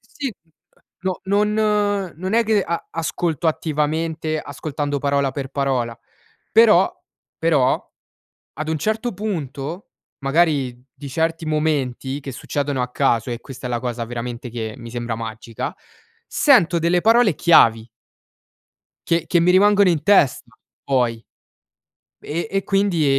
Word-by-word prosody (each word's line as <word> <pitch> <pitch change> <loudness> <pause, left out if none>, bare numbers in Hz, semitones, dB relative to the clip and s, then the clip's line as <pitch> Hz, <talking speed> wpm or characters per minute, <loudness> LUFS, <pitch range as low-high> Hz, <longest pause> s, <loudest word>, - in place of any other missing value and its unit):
Sì, 275 -5 -6
mhmm, 165 - -36 0.3
ehm, - - -31 0.2
no 185 -1 -2
non 205 -1 +1
non 185 +4 -4
è 230 0 +4
che 210 -2 +2
a 170 0 -3
ascolto 165 -1 -2
attivamente, 155 +1 -1
ascoltando 145 0 -4
parola 140 -1 +1
per 135 -1 -5
parola, 130 -4 -1 0.6
però, 215 -5 +6 0.5
però 150 -6 +1 0.7
ad 155 +1 -3
un 160 - 0
certo 220 - -1
punto, 165 -4 -5 0.3
magari 135 -4 +1
di 140 0 -9
certi 165 +3 -1
momenti, 145 -3 -1
che 135 - -6
succedono 140 +1 -2
a 125 - -2
caso 115 0 +1
e 120 - -4
questa 130 -1 -8
è - - -6
la 120 -1 -1
cosa 120 -2 -3
veramente 120 +1 -6
che 110 -2 -5
mi 115 -1 -9
sembra 120 -1 -4
magica, 110 0 -6 0.5
sento 180 - +4
delle 170 +2 +2
parole 225 -6 +4
chiavi 115 -9 +5 1.2
che 165 -1 +2
che 170 - +3
mi 175 - +4
rimangono 200 0 +5
in 160 -4 +1
testa, 130 - +3 0.3
poi, 125 -4 +1 1.0
e 170 +7 -3
e 195 0 -1
quindi 195 -6 +1
155 Hz, 135 wpm, -21 LUFS, 130-185 Hz, 1.2 s, però